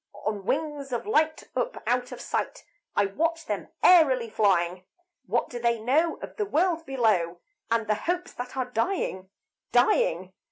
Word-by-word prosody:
On 205 -2 -2
wings 295 -2 -2
of 240 - -2
light, 315 -7 +1
up, - - -1
out 250 0 0
of - - -7
sight - - -3 0.3
I 205 - +3
watch 330 +11 -1
them - - -3 0.2
airily 265 -10 +5
flying. 185 -4 +2 0.4
What 235 +5 +1
do 240 - -5
they 235 -1 +1
know 295 +9 +2
of - - -8
the 420 - 0
world 335 -1 +1
below, 210 -10 +1 0.3
And 230 -1 +1
the 215 - +2 0.2
hopes 360 +1 -1
that 250 +2 -7
are 260 - 0
dying, 225 - -1 0.4
dying? 185 -7 +2
245 Hz, 160 wpm, -27 LUFS, 210-320 Hz, 0.4 s, airily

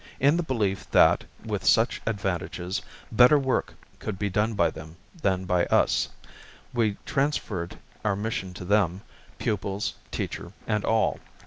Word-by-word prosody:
In 145 +4 +5
the 175 - +1
belief 110 - -1
that, - - +5 0.2
with - - -2
such - - +3
advantages, 95 -3 -2 0.3
better 125 +6 +7
work 130 -2 0 0.2
could 105 -3 -4
be 100 0 -1
done 105 +3 +1
by 85 -5 +3
them 80 +1 -10 0.3
than 95 -1 +1
by 90 -1 +2
us, - - +3 0.6
we 110 -4 +1
transferred 115 - -1 0.3
our 105 -2 +1
mission 100 -2 -3
to 90 - -7
them, 95 -2 +2 0.4
pupils, 100 -1 -2 0.2
teacher - - -4
and 105 -1 0
all. 110 0 +2
100 Hz, 140 wpm, -26 LUFS, 95-115 Hz, 0.6 s, better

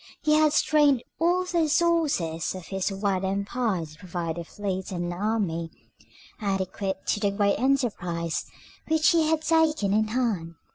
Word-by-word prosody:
He 305 -1 +3
had 305 0 +5
strained 290 -4 +3 0.2
all 350 +2 +2
the 360 -1 0
resources 300 - +1
of 185 -2 -8
his 195 0 -1
wide 195 -1 -1
empire 200 -1 -1
to 155 0 -14
provide 170 -2 -4
a - - -4
fleet 190 +1 -4
and 175 -1 -3
army 180 -4 -1 0.7
adequate 195 -1 -2
to - - +1
the 205 -1 +1
great 200 0 +1
enterprise 200 - -1 0.4
which 315 -1 +3
he 325 -2 +3
had 315 0 +1
taken 315 -10 +2
in 215 +1 +2
hand. 215 -9 -1
205 Hz, 150 wpm, -26 LUFS, 185-300 Hz, 0.7 s, had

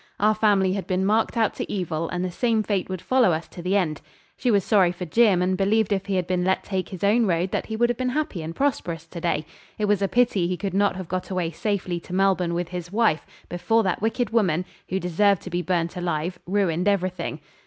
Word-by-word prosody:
Our 215 +1 +4
family 205 -3 +2
had 195 -1 -4
been 185 0 0
marked 220 +3 +1
out 225 -2 +2
to - - -4
evil, 165 -4 -2
and 180 0 -2
the 180 - -3
same 225 +2 +1
fate 200 -3 -1
would 185 -2 -5
follow 255 -8 +3
us 160 +1 -3
to 175 - -9
the 185 +3 0
end. 155 -6 -1 0.3
She 250 - -1
was 200 -4 +3
sorry 190 -5 +4
for 180 0 -6
Jim, 195 0 +3
and 185 +1 +1
believed 205 +2 +2
if 195 0 -2
he 195 - 0
had 180 -1 0
been 180 0 0
let 190 +1 +1
take 190 -2 -3
his 185 -1 -8
own 215 +3 +3
road 175 +1 0
that - - -2
he 220 - -4
would 240 +2 +3
have 240 - -2
been 255 0 0
happy 305 - -2
and 160 +1 -6
prosperous 175 - -1
to 170 +1 -9
day. 155 -3 0 0.3
It 210 - 0
was 205 -1 +2
a 195 - +2
pity 210 -4 +2
he 180 0 -2
could 195 -1 -3
not 200 -1 +2
have 185 -2 -6
got 185 +2 -3
away 180 -3 -1
safely 185 -1 -2
to 180 - -11
Melbourne 185 -2 +2
with 175 0 -2
his 180 -1 -6
wife 210 -7 +1 0.2
before 225 +6 +1
that 185 -2 -1
wicked 225 0 0
woman, 185 -7 +2 0.2
who 190 - 0
deserved 190 +2 +2
to 185 - -8
be 175 +1 0
burnt 170 0 -1
alive, 175 0 -2
ruined 185 -2 +1
everything. 185 -5 -1
185 Hz, 245 wpm, -24 LUFS, 175-210 Hz, 0.3 s, Our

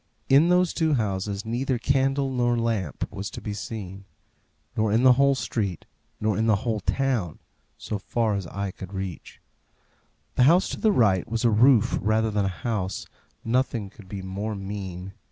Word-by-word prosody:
In 145 +6 +6
those 180 -1 +3
two 160 -3 +2
houses 100 -2 -2
neither 125 +3 -1
candle 135 +2 +1
nor 120 -2 +1
lamp 115 -9 -1
was 100 0 -5
to - - -8
be 105 - -5
seen; 100 -2 -7 0.7
nor 110 -1 +1
in 115 +4 +3
the 130 -1 +8
whole 140 +2 +4
street; 100 -9 -3 0.3
nor 105 -1 +1
in 110 +3 +1
the 110 - +5
whole 110 -3 0
town, 120 - -1 0.4
so 105 - -4
far 110 +2 0
as 100 -3 -3
eye 100 +2 -4
could 95 +1 -10
reach. 95 -3 -6 1.0
The - - +5
house 175 +3 +4
to - - -5
the 220 - +3
right 100 - +2
was 115 +1 -1
a 115 - +5
roof 120 +1 +4
rather 110 +1 +1
than 105 -1 +1
a 90 -5 -4
house; 100 -5 -2 0.4
nothing 115 -4 0
could 105 -4 -15
be 100 -2 -6
more 100 +3 -4
mean. 95 -2 -6
110 Hz, 175 wpm, -25 LUFS, 100-125 Hz, 1.0 s, the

